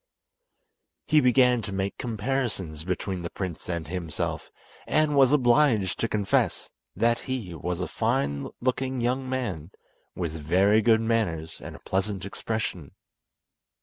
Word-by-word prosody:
He 155 -1 +4
began 125 -1 +4
to 100 - -5
make 95 0 -2
comparisons 110 - -2
between 90 +1 -3
the 85 - -4
prince 90 -2 -5
and 85 -3 -3
himself, 85 -2 -3 0.4
and 155 -1 +2
was 135 -2 +6
obliged 120 - +3
to 115 - +1
confess 105 -3 0 0.2
that 115 +3 +2
he 120 -9 -4
was 85 +2 -3
a 90 - -2
fine 110 - -1
looking 130 +1 -1
young 130 +2 -1
man 100 - -3 0.5
with 85 -3 -2
very 95 +8 +3
good 110 0 +4
manners 90 -9 -1
and - - -7
a - - -11
pleasant 95 0 -1
expression. 100 -7 -4
105 Hz, 135 wpm, -26 LUFS, 90-125 Hz, 0.5 s, was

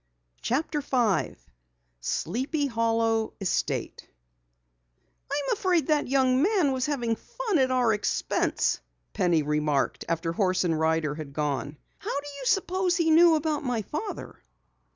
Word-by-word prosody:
CHAPTER 295 +4 -1
5 245 -8 0 0.6
SLEEPY 260 - -2
HOLLOW 225 -2 0
ESTATE 195 -3 -2 1.2
"I'm 285 -1 0
afraid 365 -5 +1
that 300 -1 +2
young 260 -1 +3
man 365 -5 +3
was 260 0 -1
having 240 -6 -1
fun 445 -10 -2
at 260 -1 +3
our 250 -3 +2
expense," 210 - 0 0.3
Penny 170 -4 +2
remarked 150 -1 0
after 165 0 -1
horse 185 0 +1
and 165 -3 0
rider 160 -2 +1
had 150 -2 -8
gone. 145 0 -2 0.2
"How 280 - -3
do 290 - -9
you 265 - -7
suppose 375 +1 +1
he 330 -2 +2
knew 330 +1 +7
about 305 -1 -1
my 245 -5 -1
father?" 350 - -6
250 Hz, 130 wpm, -27 LUFS, -, 1.2 s, knew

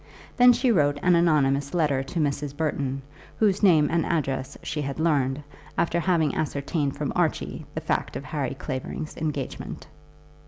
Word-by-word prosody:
Then 245 0 +7
she 245 +1 +2
wrote 145 -7 +3
an 180 - +5
anonymous 145 -3 +2
letter 150 -6 +2
to 135 +5 -4
Mrs. 145 -1 -1
Burton, 140 -4 -2 0.3
whose 205 -3 +2
name 165 -7 +5
and 165 -1 +2
address 135 -6 -2
she 150 -1 -3
had 140 +1 -4
learned, 145 -3 +1 0.3
after 170 +1 +1
having 170 -4 +2
ascertained 140 -1 -1
from - - -2
Archie - - -1
the - - -2
fact - - -1
of - - -4
Harry - - -3
Clavering's 130 +4 -5
engagement. 150 -4 -4
150 Hz, 155 wpm, -25 LUFS, 140-170 Hz, 0.3 s, Then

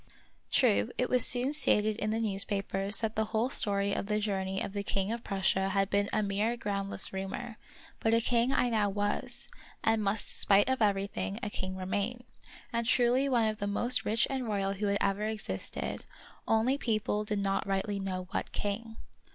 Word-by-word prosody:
True, 100 +1 +3
it 250 - 0
was 250 -2 +5
soon 250 +3 +4
stated 215 -7 +6
in 215 - -2
the 220 +1 -1
newspapers 195 -1 -1
that 220 -1 -2
the 220 - +1
whole 220 +4 -1
story 200 -4 +1
of - - -3
the 210 0 0
journey 195 -2 -2
of 195 - -4
the 200 - -2
king 200 0 -1
of 235 0 -4
Prussia 190 0 0
had 195 0 0
been 200 0 +1
a 215 - +1
mere 210 +4 -1
groundless 200 -3 0
rumor; 195 +4 -5 0.4
but 225 - +1
a 230 - +4
king 235 +2 +1
I 250 - +2
now 215 -3 +1
was, 205 +1 -2 0.4
and 225 -1 +2
must 205 +1 0
spite 200 +2 +4
of 260 -2 0
everything 195 - 0
a 205 - -3
king 185 -1 -4
remain, 200 +6 -3 0.5
and 235 0 -1
truly 250 +3 +3
one 235 -4 +3
of 215 -1 -3
the 205 - -2
most 240 +5 +1
rich 225 +2 +2
and 265 -3 -3
royal 195 -2 -1
who 205 +1 -2
had 200 0 +1
ever 200 +1 0
existed; 220 -1 -4 0.4
only 235 +5 +2
people 215 -3 -1
did 210 0 -2
not 195 0 -1
rightly 195 +1 -1
know 185 -1 -3
what - - -3
king. 225 +2 -4
210 Hz, 190 wpm, -30 LUFS, 195-230 Hz, 0.5 s, stated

